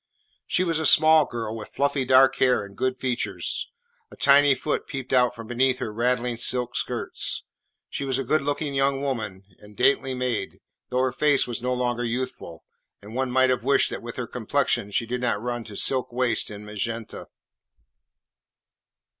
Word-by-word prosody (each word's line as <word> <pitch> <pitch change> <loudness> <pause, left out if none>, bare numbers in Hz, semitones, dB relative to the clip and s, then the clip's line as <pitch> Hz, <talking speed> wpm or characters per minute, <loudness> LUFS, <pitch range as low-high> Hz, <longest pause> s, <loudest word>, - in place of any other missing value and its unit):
She 180 - +1
was 165 -3 0
a 160 - -1
small 155 -1 +6
girl, 115 -3 -5
with 110 -2 -8
fluffy 140 -1 0
dark 130 +1 +5
hair 125 -5 +2
and 100 0 -14
good 130 +2 -1
features. 125 -2 -1 0.4
A - - -13
tiny 140 0 +5
foot 150 - -3
peeped 135 -3 -5
out 125 -1 +3
from 115 -1 -9
beneath 125 +2 +1
her 110 - -5
rattling 120 +1 0
silk 125 +1 +1
skirts. - - -2 0.4
She - - -5
was 135 -2 -1
a 135 - -1
good 155 - +1
looking 145 +1 -2
young 135 0 +1
woman 110 -8 -3 0.2
and 105 -1 -16
daintily 135 -1 +2
made, 125 -2 -3 0.3
though 125 +1 +1
her 130 - +1
face 145 +1 +2
was 120 -1 -5
no 125 +1 -1
longer 120 -1 -1
youthful, 120 -8 -5 0.4
and 105 +2 -12
one 130 +1 -1
might 130 +1 +3
have 125 -2 -1
wished 135 +1 +3
that - - -5
with - - -8
her - - -3
complexion 100 - 0
she 110 +3 0
had 125 +2 -4
not 115 -4 0
run 120 +1 -4
to 105 - -10
silk 130 +4 0
waists 125 0 0
in 105 0 -9
magenta. 110 +2 -5
125 Hz, 180 wpm, -25 LUFS, 115-135 Hz, 0.4 s, small